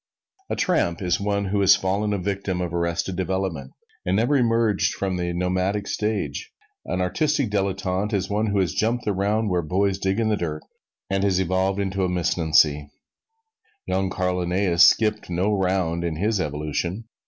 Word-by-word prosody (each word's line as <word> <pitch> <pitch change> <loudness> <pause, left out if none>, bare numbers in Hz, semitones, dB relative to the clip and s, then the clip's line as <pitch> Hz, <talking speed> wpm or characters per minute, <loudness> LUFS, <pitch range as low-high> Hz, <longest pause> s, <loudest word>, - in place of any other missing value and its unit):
A - - -1
tramp 165 - +1
is 90 -3 0
one 100 0 0
who 100 +1 0
has 100 0 +7
fallen 100 +3 -1
a 100 - 0
victim 95 -1 -2
of 90 -2 -3
arrested 85 +2 -1
development 95 -7 -3 0.3
and 90 - 0
never 120 +7 +2
emerged 115 -5 +2
from 95 -1 -2
the 85 -1 -2
nomadic 90 +3 -1
stage; 110 - -3 0.4
an 90 - -1
artistic 145 - 0
dilettante 95 0 -1
is 95 -1 -1
one 105 +2 0
who 100 -1 0
has 95 -3 +1
jumped 115 +3 0
the 105 - +1
round 105 +2 0
where 90 -1 +1
boys 95 +4 0
dig 95 +3 0
in 110 -1 +1
the 105 - +1
dirt 75 -4 -4 0.5
and 95 0 +1
has 95 -2 +2
evolved 95 +2 0
into 95 -1 -1
a 90 - +1
missnancy. 80 -4 +2 1.0
Young 95 0 0
Carl 90 -1 -1
Linnæus 90 0 0
skipped 105 +1 +4
no 90 +4 0
round 90 -3 0
in 85 -2 -2
his 105 +4 0
evolution. 75 +8 -3
95 Hz, 175 wpm, -23 LUFS, 90-105 Hz, 1.0 s, has